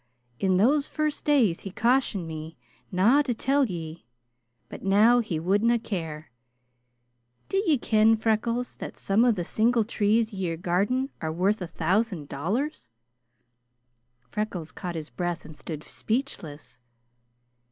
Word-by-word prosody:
In 190 -1 +2
those 280 +8 +3
first 305 -1 -2
days 245 - +3
he 195 - -7
cautioned 230 -4 +1
me 160 0 -7 0.3
na 215 +10 +4
to 255 -5 -1
tell 275 +4 +2
ye, 165 - -7 0.6
but - - -9
now 210 +5 +5
he 200 -9 -2
wadna 205 +8 +2
care. 160 - -5 1.2
D'ye 390 -7 +2
ken, 220 -1 +3
Freckles, 230 +2 -1
that - - -7
some 200 +4 +2
of 240 -3 +4
the 175 - -2
single 230 +5 +2
trees 220 +1 +1
ye 190 -3 -2
are 165 - -3
guarding 205 - 0
are 160 - -2
worth 190 +5 +1
a 180 - -3
thousand 185 -2 -1
dollars?" 195 - -3 1.4
Freckles 200 -7 -4
caught 175 -3 -6
his 155 -1 -6
breath 175 -2 -3
and 155 0 -11
stood 150 +1 -7
speechless. 165 - -4
205 Hz, 135 wpm, -26 LUFS, 170-235 Hz, 1.4 s, now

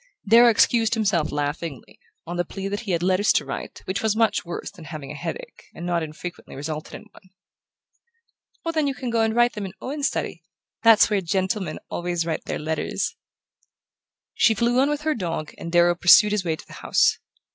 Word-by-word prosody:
Darrow 235 +3 +7
excused 230 +1 +3
himself 195 -8 +1
laughingly, 145 -1 -4 0.3
on 175 +1 -5
the 175 - 0
plea 195 +3 -6
that 205 +1 -3
he 215 -4 -5
had 170 -1 0
letters 190 +3 +3
to - - +1
write, - - -7
which 190 - -2
was 220 -1 +1
much 220 -2 +2
worse 170 -2 -6
than 165 - -13
having 150 -3 -7
a - - -7
headache, 165 +3 -7
and 170 - -7
not 175 -1 0
infrequently 160 +2 -8
resulted 150 +2 -6
in - - -10
one. 190 - -19 1.4
"Oh, 330 - 0
then 310 -3 +1
you 275 - -2
can 250 -3 -4
go 230 -1 +2
and 225 0 +1
write 240 0 +4
them 210 - -5
in 185 - -10
Owen's 285 +4 -2
study. 170 - -4 0.4
That's 225 -1 +6
where 205 -2 +2
gentlemen 185 -1 -1
always 175 -1 -2
write 160 -2 -3
their - - -3
letters." 155 +1 -2 1.2
She 230 -2 +3
flew 240 +3 +2
on 275 +2 +3
with 295 0 -2
her 310 0 +1
dog 165 - -4
and 170 - -6
Darrow 175 0 +5
pursued 175 +5 +6
his 210 -2 0
way 165 -3 -1
to - - -14
the - - -14
house. - - +3
190 Hz, 200 wpm, -24 LUFS, 170-225 Hz, 1.4 s, Darrow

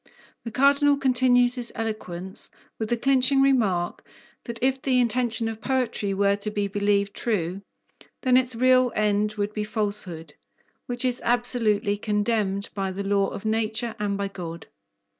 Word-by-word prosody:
The 230 - -5
Cardinal 280 +3 +4
continues 250 -2 +3
his 245 -2 -5
eloquence 190 -5 -5 0.3
with 220 -1 -3
the 240 - +1
clinching 270 +2 +3
remark 220 -11 +1 0.4
that 235 -2 -5
if 265 0 +1
the 255 -1 +2
intention 235 -1 0
of 225 0 -6
poetry 255 -6 -1
were 200 0 +3
to 205 +1 -3
be 205 -1 -1
believed 200 0 0
true, 195 -4 -2 0.6
then 255 -2 +4
its 255 -1 +3
real 255 +1 +4
end 210 0 +1
would 205 0 -2
be 210 - -2
falsehood, 200 -8 -4 0.5
which 245 +1 -2
is 250 -1 0
absolutely 230 -4 +1
condemned 210 -1 -1
by 195 -2 -2
the 195 +2 -4
law 200 0 +1
of 200 - -7
nature 220 +1 -1
and 200 -1 -1
by 200 0 -2
God. 170 -4 -8
220 Hz, 155 wpm, -25 LUFS, 200-245 Hz, 0.6 s, Cardinal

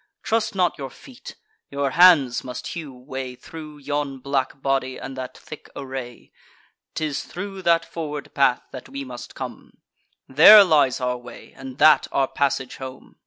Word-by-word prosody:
Trust 225 -2 -1
not 180 -4 +1
your 135 -1 -5
feet: 260 - -13 0.3
your 140 -1 -2
hands 160 -7 +5
must 125 -1 -7
hew 160 -5 -6
way 130 0 -7
Thro' 155 +2 -11
yon 145 -1 -3
black 135 0 -2
body, 135 -1 -1
and 135 - -8
that 130 -1 -7
thick 155 - -12
array: 130 -3 -8 0.6
'Tis 155 -3 -2
thro' 195 +2 -7
that 170 -2 +2
forward 150 -3 -6
path 135 -3 +2
that 130 - -10
we 140 0 -6
must 125 -2 -10
come; - - -9 0.5
There 200 +10 +9
lies 150 -8 +3
our 125 -1 -1
way, 120 0 -13
and 135 -1 -10
that 155 0 +5
our 135 -1 +1
passage 135 -2 -2
home. 130 -1 -10
140 Hz, 160 wpm, -23 LUFS, 130-155 Hz, 0.6 s, There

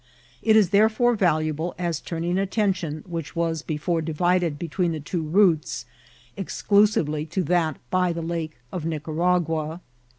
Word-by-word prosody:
It 220 -1 +4
is 210 -5 +5
therefore 220 +4 +4
valuable 155 -3 0
as 170 -3 -1
turning 175 +2 -2
attention, 190 -6 -1
which 165 -4 -6
was 165 -2 0
before 165 +2 -1
divided 170 0 +1
between 170 +2 -1
the 155 - -4
two 160 +4 -3
routes, 160 - +2 0.5
exclusively 195 -6 +2
to 180 +4 -1
that 160 -2 +1
by 180 -1 +2
the 165 0 -4
Lake 165 -3 -4
of 180 - -4
Nicaragua. 160 0 -1
170 Hz, 135 wpm, -24 LUFS, 155-185 Hz, 0.5 s, is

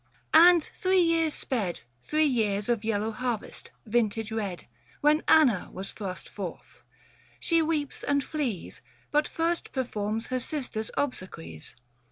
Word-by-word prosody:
And 345 -1 +8
three 375 0 +2
years 330 -3 +3
sped 210 -10 -2 0.2
Three 310 - +2
years 215 -6 +1
of 235 -3 +1
yellow 220 0 0
harvest, 240 -1 -4 0.2
vintage 225 -1 0
red, 205 -5 -3 0.4
When 300 +2 +4
Anna 260 - +5
was 190 +2 -6
thrust 190 -3 -6
forth: 185 -5 -8 0.6
she 335 -1 +2
weeps 305 -3 -1
and 280 -1 +1
flees 265 - -3
605 - - -26
But 300 0 +3
first 335 +1 -1
performs 220 -4 -2
her 255 - +1
sister's 250 -5 -3
obsequies. 185 - -4
240 Hz, 135 wpm, -28 LUFS, 210-305 Hz, 0.6 s, And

